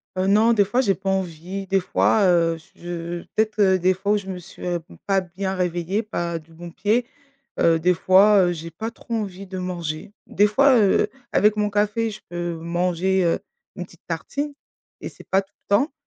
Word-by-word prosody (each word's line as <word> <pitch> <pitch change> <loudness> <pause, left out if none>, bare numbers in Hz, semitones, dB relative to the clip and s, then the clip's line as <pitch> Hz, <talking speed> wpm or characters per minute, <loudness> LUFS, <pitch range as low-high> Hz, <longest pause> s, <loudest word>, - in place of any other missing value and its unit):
Heu, 185 +1 0
non 215 +4 +5
des 205 -3 +4
fois 240 +6 +1
j'ai 200 -7 +2
pas 195 0 -4
envie. 190 0 -3
Des 195 +1 +2
fois, 205 +3 +2
heu, 170 -2 +3
j 160 - -20
je 175 0 -6
peut-être 210 -3 +3
des 185 +1 +4
fois 195 +2 -2
où - - +3
je 200 -2 -7
me 190 -1 -4
suis, 175 - -13
heu, 175 -1 -1 0.3
pas 195 -1 +3
bien 190 +2 -4
réveillée, 180 +3 -1
pas 170 -6 -3
du 165 +1 -20
bon 170 +1 -9
pied, 215 +7 0 0.5
heu, 165 -1 +4
des 180 +3 +3
fois, 195 +3 +5
heu, - - +1
j'ai 165 0 -7
pas 220 +8 -5
trop 230 0 -6
envie 195 -3 -4
de 185 0 -6
manger. 175 -1 -5
Des 205 - +3
fois, 265 +5 +4
heu, 205 -1 +3 0.2
avec 210 +1 +4
mon 210 0 +1
café 210 +2 0
je 210 - -10
peux 175 0 -3
manger, 175 +3 0
heu, 165 - +1 0.4
une 180 - -5
petite 170 - -21
tartine 285 - -3 0.5
et - - -5
c'est - - -16
pas 195 - +3
tout 195 - -22
le - - -69
temps 275 +10 +1
190 Hz, 210 wpm, -23 LUFS, 175-205 Hz, 0.5 s, non